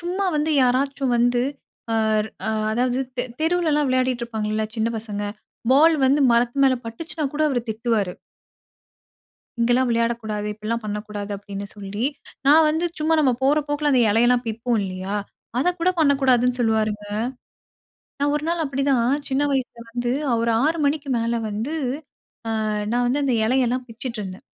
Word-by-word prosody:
சும்மா 360 +3 -2
வந்து 300 +1 0
யாராச்சும் 265 +1 +1
வந்து 245 +1 +3 0.5
அ - - +2 0.5
அ - - +2 0.2
அதாவது 245 +3 +1 0.2
தெ 245 - 0 0.2
தெருவுல 335 0 +2
எல்லாம் 295 -1 +2
விளையாடிட்டு 255 -1 +1
இருப்பாங்கள்ல, 215 -2 -2
சின்ன 225 0 +1
பசங்க. 210 -2 -5 0.5
பால் 315 +5 +6
வந்து 275 +3 +4
மரத்து 240 +3 +2
மேல 265 -1 +5
பட்டுச்சுன்னா 305 +7 -5
கூட 300 +1 0
அவரு 260 -4 0
திட்டுவாரு. 220 -4 0 1.5
"இங்கேல்லாம் 245 +2 +3
விளையாடக்கூடாது. 230 -2 -1
இப்படில்லாம் 215 +2 -4
பண்ணக்கூடாது." 210 0 -5
அப்படின்னு 200 0 -7
சொல்லி. 205 +3 -4 0.4
நான் 310 +3 +7
வந்து 320 +3 0 0.2
சும்மா 315 +1 +2
நம்ப 270 -4 +3
போற 280 +3 +4
போக்குல 290 0 0
அந்த 255 - +4
இலையெல்லாம் 240 +3 +3
பிப்போம். 230 +1 -1
இல்லயா? 190 +1 -4 0.4
அத 275 - +2
கூட 360 +2 +3
பண்ணக்கூடாதுன்னு 260 -5 +3
சொல்வாருங்க. 215 -2 +1 1.2
நான் 285 +1 +2
ஒரு 295 - -2
நாள் 335 -1 0
அப்படிதான், 275 -3 +1 0.2
சின்ன 270 +2 +1
வயசுல 255 -3 -2
வந்து 240 0 -1 0.3
ஒரு 230 0 +1
6 320 +3 +2
மணிக்கு 285 0 0
மேல 230 0 0
வந்து, 220 +8 -3 0.9
அ - - -1 0.2
நான் 245 +1 +1
வந்து 275 +4 +1
அந்த 265 -2 +1
இலையெல்லாம் 250 +1 +1
பிச்சுட்டு 230 0 -6
இருந்தேன். 190 -1 -8
245 Hz, 150 wpm, -23 LUFS, 220-280 Hz, 1.5 s, நான்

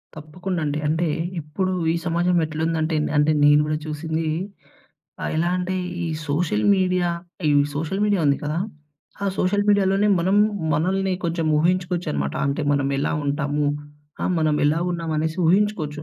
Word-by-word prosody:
తప్పకుండా 170 +4 -5
అండి. 150 0 -1
అంటే 160 +3 +1 0.3
ఇప్పుడు 185 +6 -2 0.2
ఈ - - 0
సమాజం 175 +1 +1
ఎట్లుందంటే 160 +1 -1
నే - - -3
అంటే 150 +1 +4
నేను 145 0 +6
గూడా 150 0 -1
చూసింది 160 +1 -3 1.0
ఆహ్, - - -2
ఎలా 170 +2 +1
అంటే 185 +1 -2 0.3
ఈ - - -2 0.2
సోషల్ 145 -8 0
మీడియా, 180 -1 +1 0.4
ఈ - - +4 0.2
సోషల్ 160 +6 -2
మీడియా 205 -4 +2
ఉంది 140 -1 +3
కదా! 150 +2 -2 0.7
ఆ - - +1
సోషల్ 205 +3 +1
మీడియాలోనే 200 0 +3
మనం 190 +4 +2 0.4
మనల్ని 190 +5 +1
కొంచెం 165 -1 -1
ఊహించుకోవచ్చనమాట, 175 - 0
అంటే 140 +3 -1
మనం 140 -1 +1
ఎలా 140 - 0
ఉంటాము? 145 +1 0 0.6
ఆహ్, - - +1
మనం 155 -1 +2
ఎలా 150 +2 +3
ఉన్నామనేసి 160 -2 -2
ఊహించుకోచ్చు. 170 -5 +1
160 Hz, 145 wpm, -23 LUFS, 150-180 Hz, 1.0 s, నేను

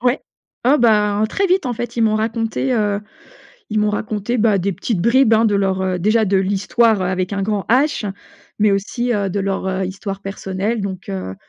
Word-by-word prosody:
Ouais. 245 +2 +1 0.4
Oh 275 +4 +4
ben, 210 -2 +3
très 390 - 0
vite 370 -4 +2
en 250 - -1
fait 240 +1 -5
ils 230 - +2
m'ont 220 -1 +3
raconté, 225 +3 -1
heu, 205 -3 0 0.7
ils 215 - -1
m'ont 210 0 +2
raconté, 210 +3 -2
bah, 215 -2 +3
des 195 +2 -1
petites 195 +2 -2
bribes, 235 +4 +4
hein, 220 +1 +5
de 210 -2 +2
leur, 195 -1 +1
heu 185 -1 -1
déjà 215 +4 +3
de 195 0 +1
l'histoire 205 +3 +2
avec 185 +1 -1
un 200 -1 -1
grand 205 -2 -1
H, 255 -4 +2 0.5
mais 210 -1 +3
aussi, 235 +5 -1
heu, 200 -2 -1
de 200 - -2
leur, 195 -1 -2
heu, 190 0 -1
histoire 195 +1 -6
personnelle. 195 +2 -3
Donc, 190 -2 -5
heu, 95 0 -4
210 Hz, 205 wpm, -19 LUFS, 195-230 Hz, 0.7 s, hein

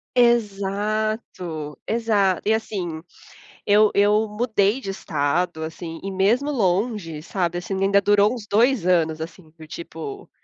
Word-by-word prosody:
Exato, 210 -7 0
exato 210 -5 +1
e 220 - +4
assim 185 -7 -3 0.6
eu 210 +1 +5
eu 210 +2 +3
mudei 210 0 +1
de 195 -7 -5
estado 160 0 -1
assim 165 +1 -7
e 195 - -4
mesmo 225 +10 +2
longe, 190 - -1
sabe 175 -1 -2
assim 175 +2 -4
ainda 200 +1 +4
durou 205 +1 +4
uns 225 -4 -8
2 225 0 +3
anos 165 -3 +2
assim 160 0 -8
do 160 - -11
tipo: 160 -3 -8
195 Hz, 130 wpm, -23 LUFS, 170-215 Hz, 0.6 s, eu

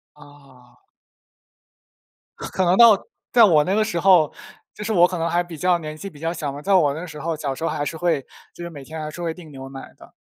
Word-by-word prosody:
啊。 140 -4 -19 1.5
可 - - -6
可 190 - 0
能 180 +2 +3
到 230 -4 +6 0.3
在 240 - +6
我 160 -7 +5
那 185 +5 -1
个 215 +1 +2
时 175 -6 -2
候， 175 -5 +5 0.4
就 210 - -8
是 220 - -3
我 175 -2 +6
可 180 - -5
能 165 0 -1
还 175 +1 +1
比 175 -2 -10
较 180 +2 +2
年 155 -2 -7
纪 195 +5 -8
比 145 -4 -16
较 165 +1 -2
小 150 -4 -4
嘛， 145 +1 -8
在 195 +5 0
我 150 -7 +4
那 160 +4 -6
时 150 -3 -10
候， 165 +2 -2
小 145 -3 -3
时 135 - -8
候 165 - 0
还 145 -1 -2
是 160 - -5
会 165 -4 0 0.3
就 175 - -9
是 170 - -6
每 145 -4 -10
天 160 +3 -8
还 155 - -5
是 175 - -9
会 165 -1 -2
订 165 -3 -13
牛 135 -1 -9
奶 135 0 -10
的。 - - -17
165 Hz, 275 characters per minute, -22 LUFS, 145-180 Hz, 1.5 s, 到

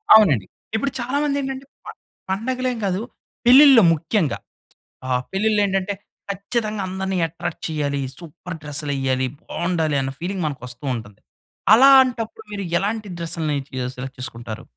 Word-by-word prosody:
అవునండి. 155 - +5 0.3
ఇప్పుడు 275 +4 0
చాలా 255 +4 -1
మందేంటంటే 275 -2 -2 0.2
ప - - -7 0.4
పండగలేం 250 +4 -1
కాదు. 190 +1 0 0.4
పెళ్ళిల్లో 265 -1 +9
ముఖ్యంగా. 165 - 0 0.7
ఆహ్, 125 -1 +1
పెళ్ళిళ్ళు 210 +2 +2
ఏంటంటే 195 0 -1 0.4
ఖచ్చితంగా 210 +2 -2
అందరిని 190 0 -2
ఎట్రాక్ట్ 165 +1 -6
చెయ్యాలి. 145 -3 -1 0.2
సూపర్ 170 +1 -9
డ్రెస్సులెయ్యాలి, 140 -3 -1
బావుండాలి 165 -4 -1
అన్న 135 0 -2
ఫీలింగ్ 180 0 -2
మనకు 140 -5 -5
వస్తూ 125 +3 -8
ఉంటది. 105 -3 -9 0.5
అలాంటప్పుడు 250 -3 +5
మీరు 200 -1 -4 0.2
ఎలాంటి 210 +1 -2
డ్రెస్‌లని 160 -3 -2 0.2
మీరు 125 -1 -2
సెలెక్ట్ 130 +1 -7
చేసుకుంటారు? 115 -3 -6
185 Hz, 125 wpm, -22 LUFS, 145-220 Hz, 0.7 s, పెళ్ళిల్లో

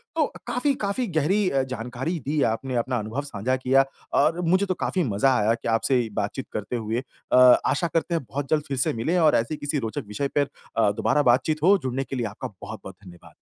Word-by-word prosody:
तो, 310 - +3 0.2
काफ़ी 275 +3 +1
काफ़ी 200 +5 -1
गहरी 190 +7 +2
अ, 135 - +1
जानकारी 125 +9 -3
दी 150 +2 0
आपने, 130 +3 -4
अपना 125 +1 0
अनुभव 110 +6 -3
साझा 130 -2 -2
किया। 130 +1 +3 0.4
और 160 +4 +2
मुझे 185 +4 +2
तो 185 - 0
काफ़ी 185 -2 0
मज़ा 120 +3 +2
आया 110 +1 +2
कि 115 - -5
आपसे 130 +3 +2
ये 115 - -4
बातचीत 105 +6 -4
करते 105 +3 -3
हुए 115 +2 -2 0.3
अ, - - +5 0.3
आशा 170 +4 +1
करते 170 +1 0
हैं 165 - -1
बहुत 140 0 -4
जल्द 150 -1 +2
फिर 135 - -3
से 130 - +1
मिलें 140 +11 0
और 155 -2 +5
ऐसे 115 +7 0
किसी 145 0 -2
रोचक 110 -2 -4
विषय 105 +7 -2
पर 145 -1 +3 0.3
अ, 105 -3 +4
दोबारा 145 +7 +1
बातचीत 155 +4 0
हो। 200 +3 +6
जुड़ने 130 +1 -1
के 135 - -6
लिए 120 -3 -1
आपका 105 -1 -7
बहुत-बहुत 105 -3 -8
धन्यवाद। 90 -2 -14
135 Hz, 220 wpm, -25 LUFS, 115-155 Hz, 0.4 s, हो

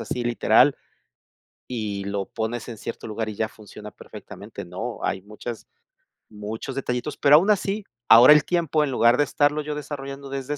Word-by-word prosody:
así 125 - -4
literal 120 -1 +3 0.9
y 105 -5 -4
lo 100 -1 -3
pones 115 +2 -4
en 115 - -8
cierto 115 - -7
lugar 110 0 -4
y 110 - -5
ya 110 +1 -2
funciona 105 -1 -12
perfectamente, - - -11
¡no! - - -6
Hay 95 -1 -2
muchas 110 +3 -8 0.7
muchos 110 +5 -6
detallitos, 135 +1 -3
pero 145 0 +6
aún 190 +6 +2
así, 205 +1 0 0.2
ahora 120 +6 +9
el 150 - +3
tiempo 165 -3 +1
en 140 - -2
lugar 120 -1 +4
de 145 - +4
estarlo 145 +1 +1
yo 150 0 -4
desarrollando 140 -2 -7
desde 140 +2 -4
125 Hz, 170 wpm, -23 LUFS, 110-145 Hz, 0.9 s, ahora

